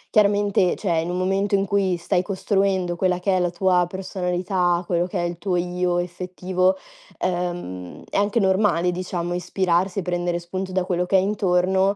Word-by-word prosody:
chiaramente 205 -3 +3
cioè, 170 -5 0
in 165 - -4
un 180 - -2
momento 195 +2 +1
in 195 0 +1
cui 195 -2 +1
stai 170 +1 0
costruendo 190 -1 0
quella 180 0 +1
che 190 +1 +1
è - - +2
la 175 -1 +1
tua 180 0 +2
personalità, 180 -1 -1
quello 175 0 +1
che - - -4
è - - 0
il 175 0 -3
tuo 180 0 -1
io 180 0 0
effettivo, 185 +1 -1 0.4
uhm, 175 - -3
è - - -8
anche 205 +3 +2
normale 190 -3 +2
diciamo, 175 -1 -3
ispirarsi 180 +1 0
e - - -1
prendere 175 0 -1
spunto 185 +2 -5
da 185 -1 0
quello 180 -1 0
che 190 +2 +3
hai 185 - +3
intorno 190 -1 +2
180 Hz, 180 wpm, -23 LUFS, 175-190 Hz, 0.4 s, chiaramente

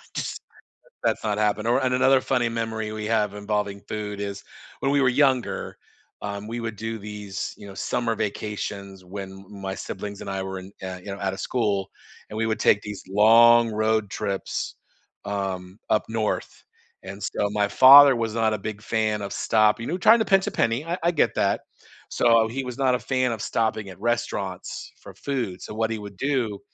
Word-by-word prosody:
Just - - -4 0.6
that's - - 0
not 105 -1 0
happen 105 +1 +1
or 120 - +2
and 125 -1 +1
another 130 +1 +4
funny 125 -3 +1
memory 110 -1 -3
we 110 0 -4
have 105 -2 +1
involving 105 -1 -2
food 105 -1 -4
is, 100 0 -4 0.4
when 135 - +1
we 140 - +3
were 135 - +4
younger, 130 -1 +1 0.4
um, 100 0 -5
we 115 +1 -4
would 115 -2 -4
do 115 +1 -4
these, 105 -2 -6
you 100 - -12
know, 100 - -10
summer 115 +4 -1
vacations 100 -2 -4
when 95 +1 -7
m 95 +1 -12 0.2
my 95 0 -3
siblings 100 +1 -6
and - - -7
I 95 0 -2
were 95 0 -5
in, 95 +1 -10
yeah, 95 -1 -5
you 90 - -17
know, 100 -1 -5
outta 95 -1 -2
school, 100 -6 -1 0.4
and 105 - -8
we 115 - 0
would 110 0 -1
take 100 - +4
these 105 -1 -7
long 115 +3 +6
road 110 -1 0
trips, 100 -2 -3 0.5
um, 95 -2 -4
up 105 - +2
north, 110 -1 -2 0.4
and 95 +2 -9
so, 105 - -1
my 105 0 +1
father 140 +4 +9
was 115 -1 -2
not 110 -1 +2
a - - -2
big 105 +1 -6
fan 110 -2 0
of 100 - -5
stopping, 110 +1 +2
no 175 - -1
trying 225 +6 +6
to 220 - +1
pinch 195 -1 +3
a - - -1
penny, 115 +6 0
I 175 +2 -3
I 170 - +3
get 165 - +1
that. - - +1 0.5
So, 115 -1 +4
he 135 +4 -3
was 125 -1 -6
not 130 -2 +3
a 125 - +1
fan 130 -2 0
of 110 - -4
stopping 110 -3 -1
at 95 - -11
restaurants 120 +2 -3
for - - -11
food, 125 -10 -3
so - - -7
what 110 +1 0
he 110 - -2
would 100 -2 -9
do, 125 -7 0
110 Hz, 200 wpm, -24 LUFS, 100-115 Hz, 0.6 s, father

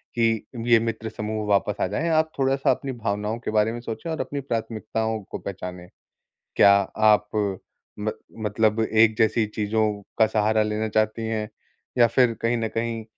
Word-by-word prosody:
कि 115 -2 +1 0.2
ये 120 -1 +6
मित्र 115 -1 -3
समूह 110 0 -4
वापस 100 0 +2
आ - - +3
जाए, 165 - -2
आप 160 0 +2
थोड़ा-सा 135 0 +2
अपनी 135 - -3
भावनाओं 105 -1 -2
के 120 - -4
बारे 110 +1 +2
में 120 - -5
सोचे 120 +8 -6
और 160 - -3
अपनी 145 - -4
प्राथमिकताओं 110 -2 -2
को - - -3
पहचानें। 90 -2 -7 0.7
क्या 100 - +7 0.4
आप 105 0 +5 0.7
म 105 +1 0 0.3
मतलब 110 +1 +1
एक 110 0 +3
जैसी 110 0 +3
चीज़ों 110 +1 0 0.4
का 110 - +6
सहारा 110 0 +2
लेना 105 +1 -1
चाहती 110 +1 0
हैं, 110 -1 -2 0.5
या 120 - +7
फिर 125 0 +3
कहीं 115 +1 +2
न 115 -1 -1
कहीं 115 -1 -2
110 Hz, 170 wpm, -24 LUFS, 105-115 Hz, 0.7 s, क्या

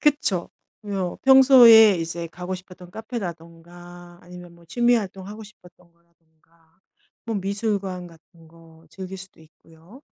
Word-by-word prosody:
그쵸. 290 - 0 0.3
뭐 195 -4 -4
평소에 245 -6 +7
이제 170 +1 -5
가고 180 +3 -7
싶었던 180 -1 -13
카페라든가 175 -4 -10
아니면 175 -1 -14
뭐 170 0 -21
취미 240 +6 +1
활동하고 205 0 -6
싶었던 180 -4 -19
거라든가. 165 0 -36 0.5
뭐 225 - -3
미술관 200 -2 -4
같은 165 0 -20
거 165 0 -20
즐길 190 +1 -9
수도 190 -3 -14
있고요. 165 - -20
180 Hz, 290 characters per minute, -22 LUFS, 170-205 Hz, 0.5 s, 평소에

